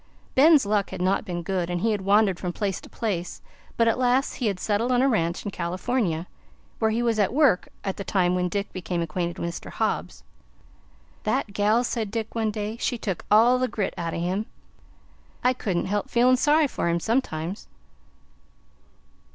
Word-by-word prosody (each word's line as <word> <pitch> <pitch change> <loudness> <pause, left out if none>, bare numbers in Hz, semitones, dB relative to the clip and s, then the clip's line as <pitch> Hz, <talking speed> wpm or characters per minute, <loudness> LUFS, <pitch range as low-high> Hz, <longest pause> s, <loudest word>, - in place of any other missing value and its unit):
Ben's 295 -1 +6
luck 205 -1 +1
had - - -7
not 185 +2 +1
been 175 -1 -4
good, 180 -1 -1
and 175 -1 -2
he 225 - +2
had 205 -2 -1
wandered 200 -1 +3
from 180 - -3
place 195 +1 -2
to - - -13
place; 185 -6 -3 0.4
but 230 - +3
at 230 - +2
last 255 +2 +1
he 245 - -1
had 195 -3 -1
settled 215 +6 0
on 250 0 +3
a - - +4
ranch 170 -8 0
in 205 - -3
California, 180 0 -1 0.5
where 220 - +2
he 230 +2 0
was 230 -2 +1
at 205 - +2
work 270 -8 +3 0.2
at 195 - -3
the 200 - -4
time 180 -3 +1
when 180 0 0
Dick 200 +3 -3
became 175 -1 -2
acquainted 170 +1 -3
with 170 - -3
Mr. - - -8
Hobbs. - - -2 1.0
"That 200 - -1
gal," 210 +4 +2
said 230 -3 -2
Dick 220 +1 -4
one 225 -1 0
day, 210 +1 -4
"she 245 0 -1
took 195 -6 -4
all 235 +4 +5
the 255 - +1
grit 210 -5 -2
out 165 -1 -3
o' - - -3
him. 185 +5 -1 1.0
I 250 +1 +4
couldn't 190 -8 -2
help 205 +1 -2
feelin' 250 +2 +4
sorry 300 +4 +4
for 210 -10 -2
him 170 0 +1
sometimes." 195 -5 -2
205 Hz, 190 wpm, -25 LUFS, 180-235 Hz, 1.0 s, Ben's